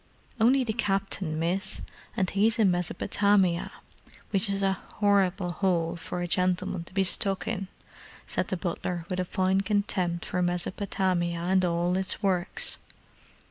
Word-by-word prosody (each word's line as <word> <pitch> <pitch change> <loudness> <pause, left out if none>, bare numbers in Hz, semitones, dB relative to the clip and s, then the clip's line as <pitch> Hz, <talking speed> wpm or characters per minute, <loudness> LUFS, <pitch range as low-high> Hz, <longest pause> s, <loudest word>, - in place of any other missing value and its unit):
"Only 255 +4 +4
the 225 -3 -2
Captain, 195 -5 -1
miss, 185 +4 0 0.3
and 190 - +2
he's 215 +5 +2
in 210 -5 +4
Mesopotamia, 180 +1 +1 0.6
which 195 -1 +2
is 195 0 0
an 190 -1 +1 0.2
'orrible 190 -4 +2
'ole 175 -3 +1
for 165 +1 -6
any 175 0 -2
gentleman 180 0 0
to - - -14
be 195 - +3
stuck 195 +1 +2
in," 195 -4 -2 0.6
said - - -1
the 190 - -2
butler 175 -1 -3
with 185 -1 -2
a 180 - 0
fine 190 +1 +1
contempt 195 -4 0
for 180 - -1
Mesopotamia 180 -1 0
and 185 +2 +1
all 175 0 +1
its 190 +3 -2
works. 185 -2 0
185 Hz, 145 wpm, -27 LUFS, 175-195 Hz, 0.6 s, Only